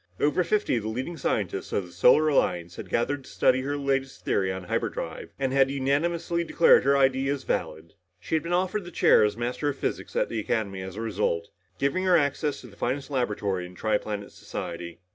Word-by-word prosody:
Over 150 Hz, +5 st, +2 dB
fifty 210 Hz, -, +1 dB
of -, -, -1 dB
the 110 Hz, -, -4 dB
leading 130 Hz, +10 st, -4 dB
scientists -, -, -2 dB
of 100 Hz, -, -1 dB
the 90 Hz, -, -14 dB
Solar 125 Hz, -, +5 dB
Alliance 90 Hz, -, +1 dB
had -, -, -7 dB
gathered 135 Hz, +4 st, 0 dB
to -, -, -14 dB
study 130 Hz, +1 st, +3 dB
her 145 Hz, +2 st, -2 dB
latest 135 Hz, -1 st, -2 dB
theory 95 Hz, -1 st, +1 dB
on 95 Hz, 0 st, -5 dB
hyperdrive, 90 Hz, -, -3 dB
and 135 Hz, -1 st, -1 dB
had 135 Hz, -1 st, +4 dB
unanimously 165 Hz, +5 st, 0 dB
declared 170 Hz, 0 st, +5 dB
her 140 Hz, 0 st, +4 dB
ideas 135 Hz, 0 st, +2 dB
valid. 80 Hz, +1 st, -3 dB, 0.3 s
She 90 Hz, -, -7 dB
had 160 Hz, -, +3 dB
been 170 Hz, +3 st, -5 dB
offered 185 Hz, +3 st, 0 dB
the 175 Hz, -, -8 dB
chair 170 Hz, -, +5 dB
as 105 Hz, +1 st, +1 dB
Master 125 Hz, +5 st, -1 dB
of 140 Hz, -, -4 dB
Physics -, -, -4 dB
at -, -, +2 dB
the 115 Hz, -, -3 dB
Academy 100 Hz, -3 st, -2 dB
as 95 Hz, 0 st, -7 dB
a 110 Hz, -, -5 dB
result, 105 Hz, -6 st, -1 dB, 0.3 s
giving 140 Hz, +7 st, 0 dB
her 180 Hz, -2 st, +5 dB
access 145 Hz, 0 st, 0 dB
to 125 Hz, -, -11 dB
the 100 Hz, -, -15 dB
finest 135 Hz, +6 st, -2 dB
laboratory 105 Hz, -8 st, -1 dB
in 90 Hz, -, -14 dB
the -, -, -16 dB
tri 110 Hz, -1 st, +1 dB
planet 105 Hz, -1 st, -5 dB
society. 85 Hz, 0 st, -7 dB
130 Hz, 215 wpm, -26 LUFS, 100-145 Hz, 0.3 s, Solar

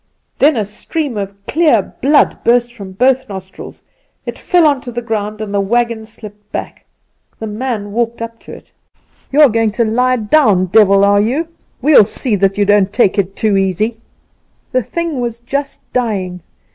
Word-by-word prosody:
Then 290 Hz, -2 st, +4 dB
a 215 Hz, -, 0 dB
stream 255 Hz, +6 st, -4 dB
of 200 Hz, 0 st, -6 dB
clear 295 Hz, -, +1 dB
blood 285 Hz, +3 st, +2 dB
burst 240 Hz, 0 st, +2 dB
from 200 Hz, -5 st, -10 dB
both 260 Hz, +4 st, +1 dB
nostrils; 190 Hz, -1 st, -9 dB, 0.4 s
it -, -, -6 dB
fell 350 Hz, -3 st, +2 dB
on 285 Hz, -3 st, +2 dB
to 250 Hz, -3 st, -8 dB
the 240 Hz, 0 st, -5 dB
ground, 215 Hz, -2 st, -3 dB
and 210 Hz, -2 st, -5 dB
the 200 Hz, -, +1 dB
wagon 230 Hz, +1 st, -1 dB
slipped 210 Hz, -2 st, -13 dB
back. -, -, -6 dB, 0.5 s
The 220 Hz, -, -6 dB
man 215 Hz, -1 st, -4 dB
walked 235 Hz, +1 st, -2 dB
up 230 Hz, 0 st, -7 dB
to -, -, -13 dB
it. -, -, -13 dB, 0.6 s
"'You 290 Hz, +2 st, +4 dB
are 295 Hz, -, +8 dB
going 225 Hz, 0 st, +1 dB
to 235 Hz, +2 st, +1 dB
lie 250 Hz, +3 st, +1 dB
down, 215 Hz, -5 st, +3 dB
devil, 200 Hz, 0 st, +4 dB
are 200 Hz, 0 st, +4 dB
you? 280 Hz, +10 st, -1 dB, 0.3 s
We'll 290 Hz, -7 st, +6 dB
see 235 Hz, +4 st, -1 dB
you 200 Hz, 0 st, +2 dB
don't 205 Hz, -1 st, +3 dB
take 205 Hz, -2 st, +2 dB
it 195 Hz, 0 st, -2 dB
too 210 Hz, -3 st, +1 dB
easy.' 195 Hz, +4 st, 0 dB, 0.7 s
"The 255 Hz, -, +1 dB
thing 330 Hz, +3 st, -4 dB
was 235 Hz, -1 st, -3 dB
just 275 Hz, +4 st, -4 dB
dying. 195 Hz, -7 st, -2 dB
225 Hz, 175 wpm, -15 LUFS, 205-255 Hz, 0.7 s, are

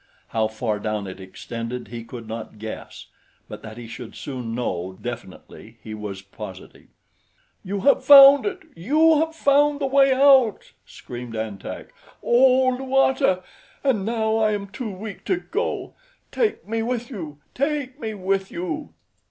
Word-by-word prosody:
How 110 Hz, -1 st, +1 dB
far 110 Hz, -1 st, -3 dB
down 105 Hz, -1 st, -3 dB
it 95 Hz, 0 st, -8 dB
extended 115 Hz, +4 st, -6 dB
he 120 Hz, 0 st, -7 dB
could 115 Hz, -1 st, -9 dB
not 110 Hz, -1 st, -7 dB
guess; 110 Hz, +1 st, -8 dB, 0.4 s
but -, -, -9 dB
that 110 Hz, +1 st, -10 dB
he 120 Hz, -, -8 dB
should 115 Hz, 0 st, -9 dB
soon 125 Hz, -5 st, -5 dB
know 95 Hz, -6 st, -3 dB
definitely 115 Hz, -1 st, -9 dB
he 110 Hz, -, -7 dB
was 105 Hz, -3 st, -6 dB
positive. 100 Hz, -, -11 dB, 0.8 s
"You 195 Hz, +1 st, -3 dB
have 280 Hz, -, +4 dB
found 280 Hz, +3 st, +9 dB
it! 375 Hz, -4 st, -4 dB
You 305 Hz, -, +4 dB
have 320 Hz, +1 st, -1 dB
found 285 Hz, -1 st, +3 dB
the 280 Hz, -, -1 dB
way 270 Hz, 0 st, +4 dB
out!" 265 Hz, -5 st, +4 dB, 0.2 s
screamed 120 Hz, -2 st, -9 dB
An 110 Hz, -3 st, -4 dB
Tak. -, -, -8 dB, 0.3 s
"Oh, 255 Hz, +1 st, +5 dB
Luata! 265 Hz, -6 st, +2 dB, 0.4 s
And 255 Hz, -8 st, +1 dB
now 220 Hz, 0 st, 0 dB
I 215 Hz, -1 st, +2 dB
am 200 Hz, -1 st, -4 dB
too 225 Hz, +3 st, -5 dB
weak 200 Hz, +1 st, -8 dB
to 375 Hz, -, +1 dB
go. -, -, -3 dB, 0.4 s
Take 440 Hz, -, -1 dB
me 225 Hz, +1 st, -1 dB
with 240 Hz, +1 st, -3 dB
you! 160 Hz, -, -7 dB, 0.2 s
Take 280 Hz, -1 st, -2 dB
me 220 Hz, -4 st, -4 dB
with 195 Hz, 0 st, -1 dB
you!" 185 Hz, -, -5 dB
200 Hz, 155 wpm, -23 LUFS, -, 0.8 s, found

